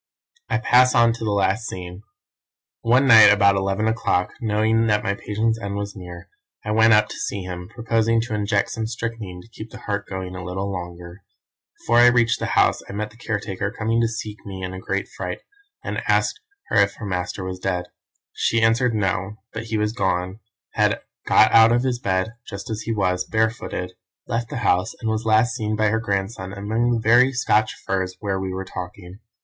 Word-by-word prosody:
"I - - +1
pass 125 +1 +4
on 115 -1 +5
to 115 - -7
the 110 - -1
last 100 +2 +1
scene. 90 +1 -7 0.8
One 125 +4 +3
night 110 -5 +9
about 100 -1 +4
eleven 95 +2 0
o'clock, 90 -5 0
knowing 110 +1 +2
that 105 -1 +2
my 100 - 0
patient's 110 +3 -1
end 100 -1 -4
was 100 0 -4
near, 90 -2 -10 0.4
I 105 - -2
went 110 +1 +5
up 105 0 +4
to - - -7
see 100 - -3
him, 90 0 -7
proposing 115 0 +1
to 115 -1 -5
inject 105 -1 0
some 110 -1 -3
strychnine 115 -5 -5
to - - -18
keep 110 0 -10
the - - -11
heart 100 -1 -3
going 95 -1 -6
a 90 - -6
little 95 +2 -3
longer. 90 0 -8 0.6
Before 120 +1 +3
I 120 - +8
reached 120 -1 +3
the - - -2
house - - +3
I - - -6
met 105 +1 -4
the - - -19
caretaker 105 -3 -3
coming 115 +1 -1
to 115 - +2
seek 110 -2 -6
me 95 -2 -7
in 95 0 -4
a 95 - -6
great 100 +1 -3
fright, 90 -1 -6 0.4
and - - -3
asked - - +1 0.3
her - - +1
if 100 0 +3
her 105 - -8
master 90 0 -3
was 95 0 -5
dead. 90 -2 -2 0.5
She 115 - +1
answered 115 +1 +2
No; 95 0 -1 0.2
but 110 0 -5
he 110 -1 -2
was 105 0 0
gone 95 -3 -1 0.3
had - - +1 0.3
got 110 - +5
out 115 0 +7
of 120 +1 +2 0.2
bed 95 -3 +1
and, 110 - -12 0.2
just 100 +4 -7
as 110 0 -3
he 115 - -4
was, 90 -4 0
barefooted, 110 -4 -2 0.3
left 115 0 -2
the 145 - -4
house, 90 +1 +1
and 110 -1 -2
was 110 +1 -2
last 110 +2 +3
seen 110 -1 -2
by 110 0 +2
her 110 +1 +1
grandson 100 -2 -3
among 110 +4 -1
the 120 - +1
very 120 +4 +5
Scotch 110 -3 +1
firs 95 -1 -2
where 100 -2 -2
we 95 0 -3
were 95 +1 -4
talking. 90 +1 -8
105 Hz, 205 wpm, -22 LUFS, 95-115 Hz, 0.8 s, night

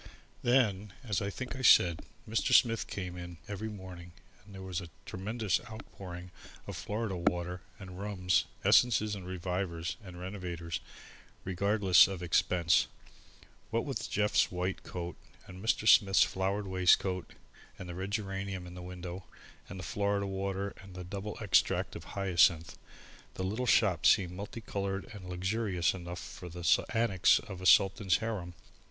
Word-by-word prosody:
Then, 105 -6 +2
as 105 -7 -1
I 100 - -1
think 125 +6 -6
I 130 - -6
said, 85 -9 +6 0.3
Mr. 110 +1 +2
Smith 115 -2 +4
came 90 -3 -5
in 85 -1 -8
every 105 +2 -4
morning 90 -4 -9 0.3
and 100 0 -14
there 95 - -8
was 95 -1 -3
a 85 - -9 0.2
tremendous 105 +2 -1
outpouring 90 -5 -9 0.3
of - - -6
Florida 105 -2 -3
water 90 +1 -1 0.2
and 95 -2 -10
rums, 95 -3 +1 0.2
essences 110 -3 +4
and 95 -3 -6
revivers 90 -3 -3
and 90 -2 -10
renovators, 90 -3 -5 0.6
regardless 95 0 +4
of 95 -2 -5
expense. 85 0 +3 0.8
What - - -1
with - - -4
Jeff's 105 +1 +2
white 90 +1 -2
coat 85 -1 -6 0.3
and 90 +2 -11
Mr. 110 -1 +1
Smith's 95 -2 +7
flowered 100 +2 -1
waistcoat 95 0 +2 0.4
and 95 - -8
the 90 - -6
red 95 +3 -4
geranium 95 -3 -3
in 90 - -10
the 90 - -8
window 90 0 -7 0.4
and 95 - -7
the - - -6
Florida 100 0 0
water 95 0 -3
and 95 -2 -13
the 90 - -6
double 100 +3 -6
extract 95 -4 +2
of - - -8
hyacinth, 85 -4 +3 0.6
the 95 - -4
little 110 +7 -2
shop 95 -8 +4
seemed 95 -4 +4
multi 100 +5 -7
coloured 100 -2 -3
and 95 -3 -9
luxurious 95 0 0
enough 85 -2 -7
for 90 -3 -9
the 85 +1 -5 0.2
annex 115 -5 +4
of 95 -4 -7
a 95 - 0
Sultan's 95 -2 +5
harem. 100 -6 -4
95 Hz, 155 wpm, -31 LUFS, 90-100 Hz, 0.8 s, Smith's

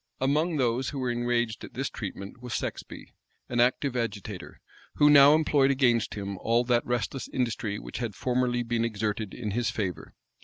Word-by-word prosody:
Among 150 +5 +1
those 125 0 +1
who 145 - -6
were 130 -2 -1
enraged 120 -2 -1
at - - -10
this - - -1
treatment 100 +5 -7
was 125 -1 -4
Sexby, - - -6 0.4
an 120 - -1
active 125 +2 +2
agitator, 105 -5 -4 0.4
who 150 0 +6
now 145 +1 +8
employed 145 -3 +3
against 125 -4 +2
him 100 -2 -5
all 115 +2 +2
that 120 -1 +2
restless 120 +2 -2
industry 115 -4 -2
which - - -7
had 115 -5 -3
formerly 125 0 0
been 115 0 -1
exerted 110 -2 -2
in 105 -3 -4
his 115 +2 0
favor. 100 -5 -4
120 Hz, 175 wpm, -27 LUFS, 110-130 Hz, 0.4 s, now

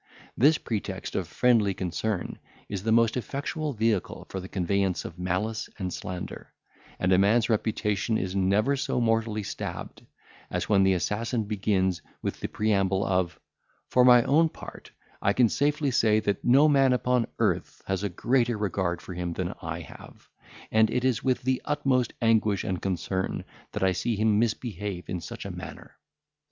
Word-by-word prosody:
This 150 +6 +5
pretext 110 -4 -4
of - - -1
friendly 110 -6 +2
concern 95 +1 -3 0.3
is 100 -3 -4
the 110 +3 -1
most 115 0 +4
effectual 145 - -3
vehicle 110 -4 -1
for 95 - -4
the 95 0 -8
conveyance 95 0 0
of 85 - -8
malice 95 +5 -2
and 90 -3 -3
slander; 90 -1 -6 0.5
and 95 +1 +2
a 90 - +5
man's 110 +4 +3
reputation 110 0 0
is 95 0 -3
never 100 +8 +2
so 135 - -1
mortally 115 -2 +1
stabbed, - - -6 0.5
as - - -2
when 100 -2 +4
the 95 0 +4
assassin 110 +5 -1
begins 95 -3 0 0.2
with - - -3
the - - -3
preamble 100 -2 +1
of, 90 -3 0 0.5
"For 125 - +4
my 125 -1 +7
own 160 +6 +4
part, - - -11 0.3
I 100 - +2
can 120 -1 +4
safely 145 +2 +1
say 110 -3 +3
that 100 -2 -1
no 135 +5 +6
man 135 -3 +4
upon 125 -1 +1
earth - - -1
has 95 -1 -1
a 100 - -1
greater 120 +4 +1
regard 95 -4 -1
for 90 - -7
him 90 -1 -3
than - - -3
I - - -4
have; - - -14 0.4
and 110 0 +4
it 125 +2 -1
is 125 -4 +1
with 130 -2 +1
the 130 0 0
utmost 135 -5 +1
anguish 110 -4 +3
and 90 -1 -3
concern 95 0 -2 0.3
that - - -3
I 95 - +4
see 110 +5 -1
him 105 0 +2
misbehave 105 -5 -2
in 90 - -3
such 80 - -8
a - - -4
manner." - - -9
105 Hz, 170 wpm, -27 LUFS, 95-120 Hz, 0.5 s, my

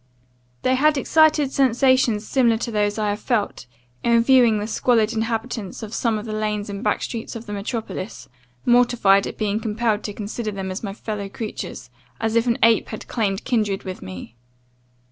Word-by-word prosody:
"They 255 - +3
had 295 +3 +3
excited 305 0 +3
sensations 255 -4 +2
similar 235 -4 +3
to 235 +1 -4
those 210 -1 0
I 210 -1 0
have 205 - -3
felt, 215 - -2 0.4
in 235 -1 +4
viewing 245 -3 +5
the 205 - -2
squalid 225 0 +2
inhabitants 225 -2 -3
of 215 0 -7
some 230 -3 0
of 210 - -6
the 215 - -5
lanes 210 -1 -2
and 200 +2 -6
back - - 0
streets 230 -1 -5
of 230 0 -7
the 210 - -6
metropolis, 200 - -5 0.4
mortified 240 -5 +4
at - - -7
being 210 0 0
compelled 220 -1 0
to 205 - -4
consider 215 +2 -4
them 195 -2 -4
as 185 - -5
my 200 -3 -4
fellow 210 -3 -5
creatures, 205 - -6 0.3
as 225 0 -1
if 230 +1 +3
an 235 - +2
ape 225 -1 +4
had 215 - -7
claimed 200 -5 -1
kindred 210 -5 0
with 185 -1 -6
me. 95 +5 -9
220 Hz, 185 wpm, -22 LUFS, 205-235 Hz, 0.4 s, viewing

